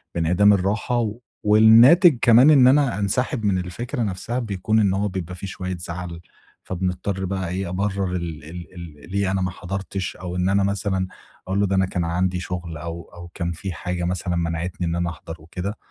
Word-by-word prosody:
بانعدام 90 +5 +4
الراحة. 105 +4 0 0.3
والناتِج 120 - +7
كمان 125 +4 +7
إن 135 -4 +7
أنا 135 -5 +3
أنسحب 115 +3 -1
من 100 -2 +2
الفكرة 105 +9 -4
نفسها، 110 +5 -3
بيكون 110 -1 0
إن 100 -3 +3
هو 100 +2 0
بيبقى 90 -2 -5
في 95 +2 -7
شوية 90 -1 -5
زعَل، 85 0 -6 0.4
فبنضطَر 95 +1 -3
بقى 95 -2 -3
إيه، 95 0 -3
أبرِّر 95 0 -1
ال 85 -3 -5
ال 85 +3 -9
ال 85 -2 -11
ليه 100 -1 0
أنا 95 - 0
ما 90 0 -1
حضرتِش، 95 +1 -5
أو 90 -1 -6
إن 90 +1 +1
أنا 100 0 +2
مثلًا 95 -1 -1 0.4
أقول 95 +1 0
له: 100 - +3
"ده 95 - 0
أنا 95 0 +3
كان 90 -2 -2
عندي 90 +2 0
شغل." 90 -3 -5
أو 85 +2 -6
أو 85 0 -10
كان 85 -1 -3
في 90 +3 -5
حاجة 90 +2 -4
مثلًا 90 0 -2
منعَتني 85 +1 -2
إن 85 - -1
أنا 85 0 -1
أحضر 80 0 -8
وكده. 90 +6 -6
95 Hz, 190 wpm, -22 LUFS, 85-100 Hz, 0.4 s, والناتِج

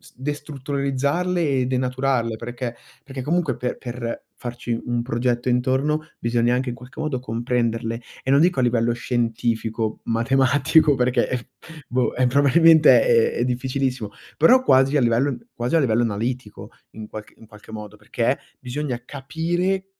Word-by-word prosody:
destrutturalizzarle 145 +4 -2 0.2
e 125 - +1
denaturarle, 130 -2 0
perché? 120 +1 -5 0.3
Perché 135 -1 -7
comunque 160 -2 0
pe 125 - -3
per 120 -1 -5
farci 120 -1 -4
un 120 -1 -1
progetto 120 0 -1
intorno 130 +5 +1 0.2
bisogna 120 +1 +1
anche 130 +1 -1
in 120 - -5
qualche 125 +2 -13
modo 155 -5 -2
comprenderle 115 -1 -2 0.2
e - - -5
non 140 +1 +5
dico 175 -4 +3
a - - +3
livello 120 -1 +2
scientifico, 115 -2 -2
matematico 135 +6 +3
perché 125 -1 0 0.4
boh, 125 0 0
eh, 125 0 +2
probabilmente 150 +4 +6
è 470 -2 +3
è - - +1
difficilissimo, 125 -2 -2 0.3
però 250 +12 +6
quasi 135 - +4
a - - +2
livello 120 +4 +1 0.2
quasi 120 +6 -1
a - - +4
livello 120 -5 +2
analitico, 110 -2 -3 0.2
in 110 -1 -9
qualc 105 0 -9
in - - -15
qualche 105 0 -15
modo, 105 -1 -8
perché 115 +5 -1 0.2
bisogna 130 -1 -4
capire 175 +8 -2
125 Hz, 145 wpm, -22 LUFS, 120-140 Hz, 0.4 s, probabilmente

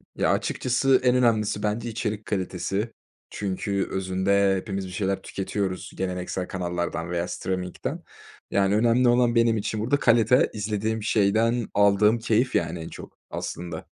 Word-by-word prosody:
Ya, - - +2
açıkçası 130 +1 +2
en 125 0 +4
önemlisi 110 -4 +2
bence 110 +3 -1
içerik 110 -1 -3
kalitesi 95 +2 -2 0.4
çünkü 100 0 -2
özünde 95 +1 +2
hepimiz 95 0 -4
bir - - -9
şeyler 95 +1 -1
tüketiyoruz 95 -1 -3
geleneksel 90 0 -3
kanallardan 85 -2 -3
veya 90 0 -1
steaming'den. 90 0 -4 0.5
Yani, 100 +1 +2
önemli 120 +3 +4
olan 120 0 +3
benim 115 -1 +4
için 105 +1 -2
burada 120 +7 +1
kalite, 115 +1 +4
izlediğim 105 +1 -2
şeyden 115 +2 +2
aldığım 105 +2 +4
keyif, 115 +3 +1
yani, 85 - 0
en 80 - -6
çok - - -11
aslında. 85 -1 -5
105 Hz, 135 wpm, -25 LUFS, 95-115 Hz, 0.5 s, en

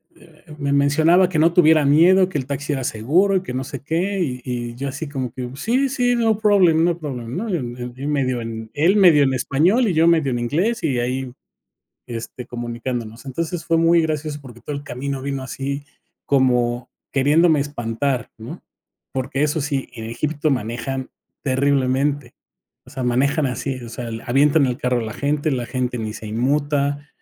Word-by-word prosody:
eh, - - -20
me 140 -1 -1
mencionaba 160 +6 +4
que 170 - -2
no 165 +2 +4
tuviera 160 -4 +5
miedo, 180 +6 +5
que 155 - -3
el 130 - -4
taxi 145 +1 -3
era 135 -2 -2
seguro 165 - +2
y 185 - +2
que 155 - -6
no 130 +1 -2
sé 135 -1 -7
qué, 175 +7 -1
y 125 -6 -2
y 120 -1 -4
yo 140 +3 -4
así 145 +3 -5
como 130 -4 -4
que: 125 0 -5
"Sí, 250 - +1
sí, 245 -2 +1
no 225 -3 +2
problem, 190 -7 +4
no 170 -1 +2
problem", 125 -6 -6
¿no?, 220 +2 -3
y 125 -2 -4
medio 130 -4 0
en, 110 -1 -6
él 170 +7 +3
medio 170 -8 +6
en 135 -1 +2
español 180 - +2
y 185 - +1
yo 165 +1 +4
medio 160 -5 +3
en 120 - -1
inglés 170 - 0
y 130 -6 +1
ahí 125 +1 -2 0.8
este, 120 +1 -7
comunicándonos. 120 0 -5
Entonces 165 +5 -4
fue 165 - +2
muy 165 +1 +4
gracioso 155 -1 -2
porque 120 -4 -13
todo 145 - -5
el 140 - -6
camino 135 +1 -4
vino 135 -1 -3
así 140 +2 -4 0.4
como 125 -3 +1 0.2
queriéndome 150 +3 +4
espantar, 135 -1 -2
¿no?, 110 - -9 0.5
porque 135 +2 -1
eso 150 +1 0
sí, 140 -2 -2
en 115 -2 -7
Egipto 150 +5 -1
manejan 125 +2 -3 0.3
terriblemente. 140 0 +1 0.5
O - - -15
sea, 135 -1 -5
manejan 140 +5 +1
así, 130 +2 -2
o 115 - -8
sea, 120 0 -6 0.2
avientan 140 +4 +4
el 125 -1 -1
carro 125 -3 0
a - - -3
la 110 -1 -5
gente, 145 +2 -1
la 125 -3 -1
gente 125 -1 -2
ni 110 -1 -4
se 110 - -9
inmuta. 145 +5 0
140 Hz, 185 wpm, -21 LUFS, 125-160 Hz, 0.8 s, medio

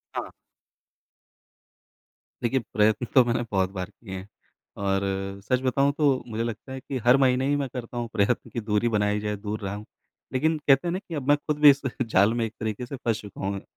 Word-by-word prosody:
हाँ। - - -3 2.1
देखिए 130 +3 +2
प्रयत्न 110 +3 +3
तो 130 - +8
मैंने 120 0 0
बहुत 95 -2 +1
बार 95 0 -5
किए 100 -1 -11
हैं, 95 +2 -9 0.5
और 95 -1 0 0.4
सच 125 +3 +2
बताऊँ 135 +2 +2
तो 140 -4 +2
मुझे 115 0 -2
लगता 115 +3 -6
है 130 - -5
कि 130 +1 -5
हर 125 +2 +7
महीने 130 -1 +3
ही 145 - +2
मैं 140 -1 -1
करता 120 -1 -6
हूँ 120 -1 -2
प्रयत्न 110 +2 +1
कि - - -4
दूरी 105 +1 +1
बनाई 105 -1 +1
जाए, 105 0 -2
दूर 105 +1 -5
रहूँ। 105 +2 -5 0.5
लेकिन 155 +5 +2
कहते 135 +4 +5
हैं - - 0
ना 185 - -1
कि 170 -4 -8
अब 140 -3 -4
मैं 145 0 +5
खुद 150 0 -3
भी 150 -1 +9
इस 140 0 +4 0.2
जाल 110 -2 +3
में 120 -1 0
एक 110 - -6
तरीके 110 +2 -3
से 130 - -6
फँस 115 -4 -1
चुका 100 -2 -10
हूँ। 100 0 -2
120 Hz, 210 wpm, -26 LUFS, 105-135 Hz, 2.1 s, भी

